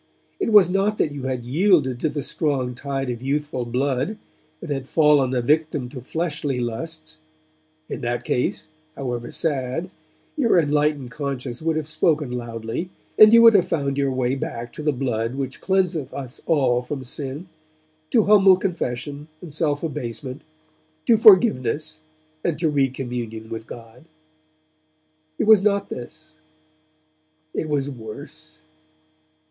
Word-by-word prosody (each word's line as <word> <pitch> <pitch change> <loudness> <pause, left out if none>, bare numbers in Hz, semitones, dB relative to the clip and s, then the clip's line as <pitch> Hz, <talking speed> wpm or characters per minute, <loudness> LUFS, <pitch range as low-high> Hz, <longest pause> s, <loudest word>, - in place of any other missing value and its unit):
It 310 - 0
was 205 -5 +8
not 195 +3 0
that 150 - +1
you 140 -2 -6
had 130 -2 -2
yielded 145 - +2
to 155 - 0
the 145 -1 -4
strong 135 -5 -1
tide 135 0 -3
of 120 -1 -6
youthful 140 -1 -2
blood, 135 - -1 0.4
and 170 - -7
had 135 -1 -3
fallen 145 -5 +4
a 125 - 0
victim 150 -2 +1
to 130 -1 -8
fleshly 150 -2 -2
lusts; 115 - -5 0.7
in - - -5
that 120 0 -2
case, 125 - -1 0.3
however 120 -3 -4
sad, 150 +3 -2 0.4
your 235 -10 +3
enlightened 150 -4 +1
conscience 135 -4 -4
would 160 0 0
have 155 -2 -2
spoken 155 -3 +1
loudly, 120 +6 -4 0.3
and 215 0 +10
you 230 0 +8
would 230 -1 +9
have 195 -4 +4
found 140 -3 -1
your 140 -1 +1
way 130 -1 0
back 120 -3 -5
to - - -7
the 150 0 +1
blood 125 -3 -2
which 135 -1 -4
cleanseth 180 -7 0
us 130 -3 -7
from - - -6
all 130 -6 +3 0.2
sin, 140 +6 -6 0.6
to 225 - +4
humble 195 -3 +6
confession 145 -5 -4
and 160 -4 -10
self 145 -1 0
abasement, 130 -3 -4 0.6
to 235 - +5
forgiveness 155 - +4 0.4
and 170 -3 0
to 165 -1 +1
recommunion 125 -5 -2
with 110 0 -6
God. 115 +4 -12 1.3
It - - 0
was 215 -2 +7
not 200 -1 +1
this; 155 +5 -9 1.2
it 155 - -3
was 145 -2 0
worse. 140 - -10
140 Hz, 145 wpm, -23 LUFS, 125-160 Hz, 1.3 s, and